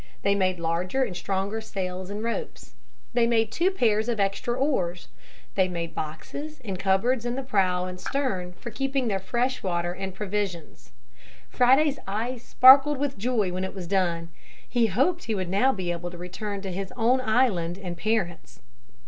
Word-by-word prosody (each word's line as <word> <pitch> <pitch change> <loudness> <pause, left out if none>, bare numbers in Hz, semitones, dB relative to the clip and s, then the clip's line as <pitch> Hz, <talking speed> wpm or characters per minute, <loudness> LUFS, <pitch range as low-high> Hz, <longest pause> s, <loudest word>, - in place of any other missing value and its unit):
They 200 - +3
made 185 -2 +1
larger 175 +10 0
and 205 -8 -3
stronger 195 +4 -2
sails 185 -3 -4
and 205 +2 -4
ropes. 230 - -4 0.4
They 235 -1 +3
made 225 -2 +2
two 350 +3 +2
pairs 225 - +1
of 230 -3 -1
extra 200 +4 0
oars. 185 - -1 0.4
They 190 -1 +3
made 170 -2 -4
boxes 270 - -6
and 190 -3 -4
cupboards 195 +6 +2
in 240 0 -2
the 270 - -3
prow 185 -7 +1
and 180 0 -6
stern 190 -11 -2
for 235 +6 -8
keeping 270 +1 -1
their 195 -2 0
fresh 245 +7 -1
water 175 -2 -1
and 190 0 -6
provisions. 190 - -4 0.6
Friday's 270 +3 +4
eyes 230 +5 -3
sparkled 270 +4 +7
with 275 -5 -2
joy 220 -4 +1
when 185 +1 -2
it 190 - -5
was 185 -2 -5
done. 170 -3 0 0.4
He 235 -2 +2
hoped 275 - +1
he 225 - -1
would 185 -3 -2
now 205 +8 +3
be 185 -7 -3
able 175 0 -4
to 175 - -10
return 195 +3 -5
to 195 -1 -5
his 190 +1 -4
own 250 +3 +3
island 220 -8 +1
and 180 -3 -6
parents. 185 -3 -2
200 Hz, 175 wpm, -26 LUFS, 180-245 Hz, 0.6 s, sparkled